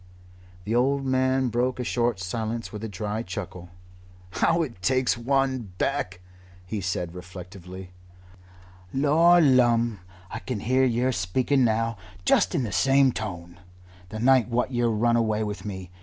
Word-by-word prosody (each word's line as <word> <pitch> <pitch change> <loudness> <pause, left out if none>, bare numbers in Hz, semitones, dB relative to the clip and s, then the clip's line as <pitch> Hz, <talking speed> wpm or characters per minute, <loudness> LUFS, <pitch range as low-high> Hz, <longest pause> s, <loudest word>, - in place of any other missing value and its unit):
The 105 - -3
old 135 +3 +2
man 130 0 +1
broke 125 +2 -1
a - - -1
short 120 -3 0
silence 110 +4 -4
with 105 0 -7
a - - -2
dry 105 +3 -3
chuckle. 90 -3 -7 0.6
"How 165 +9 +2
it 115 - -8
takes 130 +4 +2
one 130 -3 -1
back!" 95 -10 -2 0.4
he 105 +2 -4
said 90 -2 -3
reflectively. 90 0 -10 1.0
"Lor 160 - +4
lumme! 120 - +3 0.3
I 110 - -4
can 120 -5 -5
hear 130 +3 +2
yer 125 +1 +1
speaking 125 +7 +1
now 115 -1 0 0.3
just 175 - +3
in 140 - +1
the 110 - -4
same 135 +8 +4
tone 90 -6 -6 0.5
the 110 - -6
night 125 +1 +4
what 125 +2 0
yer 120 -1 +1
run 115 +2 +2
away 110 -2 +1
with 105 -2 -5
me. 95 -3 -7
115 Hz, 150 wpm, -25 LUFS, 95-130 Hz, 1.0 s, Lor